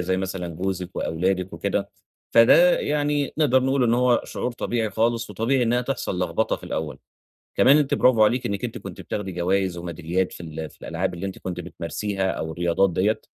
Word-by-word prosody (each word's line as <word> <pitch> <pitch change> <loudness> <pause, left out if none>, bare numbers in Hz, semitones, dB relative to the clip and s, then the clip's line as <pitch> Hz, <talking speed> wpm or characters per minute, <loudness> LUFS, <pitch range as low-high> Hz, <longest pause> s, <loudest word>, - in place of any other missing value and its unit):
زي 95 +1 0
مثلًا 95 -2 -3
جوزِك 90 +2 -4
وأولادِك 95 +2 -1
وكده، - - -2 0.4
فده 170 +10 +7
يعني 145 -1 0
نقدر 130 -4 +4
نقول 135 0 +2
إن 115 -1 +3
هو 125 0 +3
شعور 125 - -4
طبيعي 115 -2 -2
خالص، 115 +2 0
وطبيعي 115 +6 +1
إنّها 120 +1 +2
تحصل 125 -7 -3
لخبطة - - 0
في - - -13
الأول. 75 -4 -4 0.6
كمان 140 - +6
أنتِ 150 -2 +2
برافو 115 -4 +5
عليكِ 120 +4 +1
إنّك 100 -1 -3
أنتِ - - -4
كنتِ - - -9
بتاخدي 100 -2 -4
جوايز 90 +1 0
وميداليات 85 +2 -2
في - - -11
ال 80 -1 -6
في - - -21
الألعاب 90 +3 -2
اللي 85 +3 -5
أنتِ 95 - -6
كنتِ 90 -1 -5
بتمارسيها 95 +3 -3
أو 80 0 -4
الرياضات 85 +3 +1
دِيَّة، 100 +6 +1
95 Hz, 185 wpm, -24 LUFS, 90-120 Hz, 0.6 s, فده